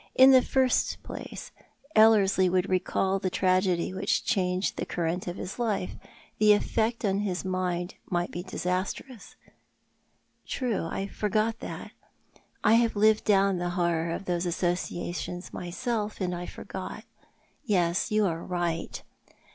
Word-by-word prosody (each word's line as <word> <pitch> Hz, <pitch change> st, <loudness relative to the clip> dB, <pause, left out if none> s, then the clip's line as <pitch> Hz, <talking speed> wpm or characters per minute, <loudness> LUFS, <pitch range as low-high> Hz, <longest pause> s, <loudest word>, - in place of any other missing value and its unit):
" -, -, -42 dB
In 270 Hz, -, +8 dB
the 260 Hz, -1 st, +7 dB
first 260 Hz, 0 st, +1 dB
place, -, -, -8 dB, 0.4 s
Ellerslie 200 Hz, -4 st, +5 dB
would 185 Hz, +1 st, +1 dB
recall 190 Hz, +1 st, +1 dB
the 185 Hz, -, -1 dB
tragedy 185 Hz, -1 st, +1 dB
which 195 Hz, +2 st, 0 dB
changed 185 Hz, -4 st, 0 dB
the -, -, -2 dB
current 175 Hz, +1 st, -2 dB
of 175 Hz, -, -3 dB
his 185 Hz, +5 st, -6 dB
life; 215 Hz, -6 st, -1 dB, 0.5 s
the 210 Hz, 0 st, +7 dB
effect 225 Hz, +3 st, 0 dB
upon 200 Hz, -1 st, +1 dB
his 190 Hz, -3 st, -2 dB
mind 180 Hz, -1 st, -2 dB, 0.2 s
might 175 Hz, -1 st, -1 dB
be 175 Hz, -, -4 dB
disastrous." 185 Hz, +6 st, -4 dB, 0.5 s
" -, -, -42 dB
True. 245 Hz, -9 st, -1 dB
I 195 Hz, -, -3 dB
forgot 215 Hz, +3 st, -1 dB
that. -, -, -7 dB, 0.7 s
I 215 Hz, -, +5 dB
have 230 Hz, -2 st, 0 dB
lived 215 Hz, +1 st, +4 dB
down 195 Hz, -2 st, +3 dB
the 175 Hz, 0 st, -1 dB
horror 170 Hz, -1 st, +1 dB
of 170 Hz, +4 st, -4 dB
those 175 Hz, 0 st, -1 dB
associations 175 Hz, 0 st, -3 dB
myself, 210 Hz, +4 st, -3 dB
and 180 Hz, -2 st, -1 dB
I 175 Hz, 0 st, -5 dB
forgot. -, -, -7 dB, 0.6 s
Yes; 180 Hz, -, +1 dB
you 215 Hz, -1 st, +2 dB
are 165 Hz, -2 st, -2 dB
right." 175 Hz, -2 st, -3 dB
185 Hz, 145 wpm, -28 LUFS, 175-210 Hz, 0.7 s, In